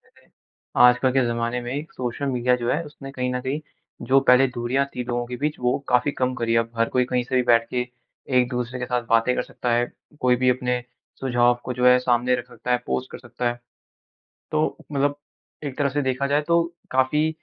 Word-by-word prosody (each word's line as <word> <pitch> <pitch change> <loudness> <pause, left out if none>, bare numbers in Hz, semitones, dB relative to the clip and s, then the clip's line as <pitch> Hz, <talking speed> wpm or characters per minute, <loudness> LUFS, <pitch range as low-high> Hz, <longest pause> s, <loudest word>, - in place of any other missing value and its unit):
जैसे - - -26 0.6
आजकल 125 +1 +4
के 130 -1 +3
ज़माने 120 +1 -1
में 120 0 -5
एक 155 +6 -5
सोशल 125 +1 -3
मीडिया 125 -1 +2
जो 120 0 -2
है, 165 - 0
उसने 145 -2 -10
कहीं 125 -1 -2
न 125 - -1
कहीं 135 +4 -3 0.5
जो 135 +2 +5
पहले 125 +1 +6
दूरियाँ 120 +3 0
थी 125 - -3
लोगों 120 0 -2
के 125 - -5
बीच, 150 +3 -2
वो 125 0 +1
काफ़ी 125 +4 +3
कम 130 0 +1
करी 115 -1 0
है, 115 - +4
अब 115 0 -2
हर 115 - +3
कोई 125 - +4
कहीं 125 -1 +2
से 130 - -5
भी 125 - +4
बैठ 115 -1 +4
के 125 0 -1 0.5
एक-दूसरे 125 0 -2
के 125 - -2
साथ 125 0 0
बातें 115 +2 +3
कर - - +1
सकता 125 - -4
है। 120 +1 +1 0.3
कोई 125 -1 +3
भी 130 - +5
अपने 125 0 -1 0.4
सुझाव 120 -2 +3
को 125 - -3
जो 125 - +4
है, 125 0 +7
सामने 125 0 +2
रख 125 -1 -6
सकता 120 0 -7
है, 125 - +3
पोस्ट 130 - -2
कर - - -7
सकता 120 0 -3
है। 120 0 -4 0.9
तो 155 0 +2 0.3
मतलब 145 +1 +1 0.5
एक 140 -1 -5
तरह 145 -1 +2
से 145 +2 -1
देखा 130 +1 0
जाए 145 +1 +2
तो 170 0 +4 0.3
काफ़ी 130 +4 +2
125 Hz, 225 wpm, -23 LUFS, 120-135 Hz, 0.9 s, है